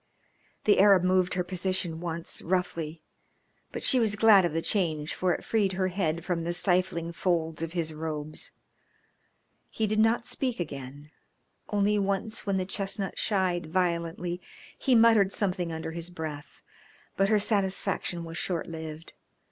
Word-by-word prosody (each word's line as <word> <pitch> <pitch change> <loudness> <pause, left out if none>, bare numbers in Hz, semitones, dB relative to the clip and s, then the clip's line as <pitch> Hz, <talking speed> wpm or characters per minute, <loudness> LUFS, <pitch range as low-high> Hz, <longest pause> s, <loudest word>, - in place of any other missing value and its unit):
The 205 - +4
Arab 195 -2 +6
moved 185 -1 +2
her 180 - 0
position 180 -2 -1
once, 170 -1 -4
roughly, 165 -3 -2 0.7
but - - -5
she 260 - +5
was 220 -3 +2
glad 205 -3 +6
of 170 - 0
the 165 - 0
change 160 -7 0
for 185 -1 0
it - - -2
freed 205 -4 +1
her 185 0 0
head 170 -3 -1
from 175 -3 -1
the 170 +1 -2
stifling 175 -2 +1
folds 165 -2 -1
of 165 0 -4
his 165 -3 -1
robes. 155 -1 -4 1.2
He 220 - -1
did 215 +1 0
not 225 +1 +3
speak 255 -5 -2
again 145 -2 -7 0.6
only 205 0 +2
once 200 +2 -2
when 195 -1 +1
the 185 - -1
chestnut 195 +1 -2
shied 185 -5 0
violently 175 0 -1 0.3
he 260 - +2
muttered 225 -4 +5
something 180 -5 -1
under 160 0 -4
his 170 +1 -5
breath. 155 -4 -7 0.5
But 195 0 +2
her 215 - +4
satisfaction 195 -4 0
was 165 0 -6
short 175 -3 -2
lived. 160 -1 -8
180 Hz, 155 wpm, -28 LUFS, 165-200 Hz, 1.2 s, Arab